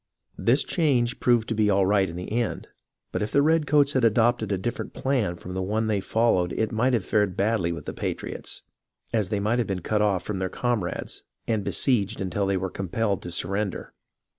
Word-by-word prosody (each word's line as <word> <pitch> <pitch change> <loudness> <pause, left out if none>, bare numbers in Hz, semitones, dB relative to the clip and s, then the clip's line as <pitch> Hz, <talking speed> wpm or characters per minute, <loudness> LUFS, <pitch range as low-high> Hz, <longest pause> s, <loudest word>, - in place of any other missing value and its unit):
This 120 +9 +3
change 125 -8 +1
proved 120 -2 +3
to - - +1
be 105 -1 +2
all 100 -1 +3
right 100 -1 +3
in 85 - -7
the 90 +2 -6
end, 120 0 -1 0.4
but - - -2
if 105 - -2
the 140 - +4
redcoats 150 -2 +3
had 130 - +1
adopted 115 -1 +3
a 100 - +1
different 120 +6 -4
plan 125 -10 0
from 90 +1 -8
the 95 - -2
one 105 +4 0
they 105 -2 +1
followed 95 -4 +1
it 110 - -1
might 125 +4 +1
have 115 -6 +1
fared 105 -4 +1
badly 100 -4 +1
with 85 - -6
the - - -4
patriots, - - -5 0.5
as 105 -5 +1
they 105 - 0
might 110 +4 +1
have 120 - 0
been 95 -2 -2
cut 105 +5 0
off 100 -4 +1
from 105 -3 -3
their 95 -1 -1
com 120 -1 -1
rades, 85 - -4 0.3
and 110 -3 0
besieged 105 -2 +1
until 95 +1 -1
they 100 -1 +1
were 95 0 -3
compelled 100 +1 -1
to 90 - -6
sur 85 +1 -2
render. 100 -1 -3
105 Hz, 215 wpm, -25 LUFS, 95-120 Hz, 0.5 s, the